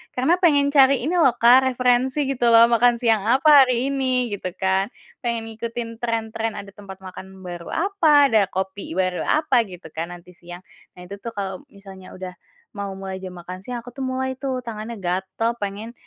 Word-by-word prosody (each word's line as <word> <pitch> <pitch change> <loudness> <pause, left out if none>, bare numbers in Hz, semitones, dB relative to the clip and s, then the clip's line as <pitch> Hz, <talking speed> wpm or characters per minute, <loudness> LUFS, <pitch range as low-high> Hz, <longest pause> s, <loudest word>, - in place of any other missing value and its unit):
Karena 300 +8 +2
pengen 285 -5 +3
cari 275 -3 +4
ini 345 +6 0
loh, 265 -7 +4
Kak, 245 +3 +5
referensi 255 +2 +1
gitu 265 -3 -1
loh 230 0 +6
makan 240 +1 +4
siang 230 -2 +2
apa 275 +2 +6
hari 255 +2 0
ini 255 -3 0
gitu 185 -3 -5
kan, 190 +1 0 0.3
pengen 235 -3 -3
ngikutin 230 +1 -6
trend-trend 225 -1 -3
ada 200 0 -8
tempat 195 -2 -12
makan 190 0 -11
baru 175 -1 -8
apa, 320 -7 +3
ada 210 -4 +3
kopi 190 -2 -5
baru 185 -1 -1
apa, 265 -7 +2
gitu 180 -4 -12
kan 165 +2 -4
nanti 175 +1 -15
siang. 175 0 -12 0.3
Nah 180 - -12
itu 200 +3 -9
tuh 230 +1 -8
kalau 195 -2 -5
misalnya 195 -2 -13
udah 185 0 -7 0.4
mau 200 -1 -5
mulai 190 -1 -6
jam 185 -1 -8
makan 180 +2 -9
siang 240 +2 -7
aku 245 - -11
tuh 270 - -8
mulai 260 0 -2
tuh 260 0 -4
tangannya 225 0 -6
gatal 190 +5 -2
pengen 205 +3 -5
230 Hz, 185 wpm, -22 LUFS, 190-260 Hz, 0.4 s, loh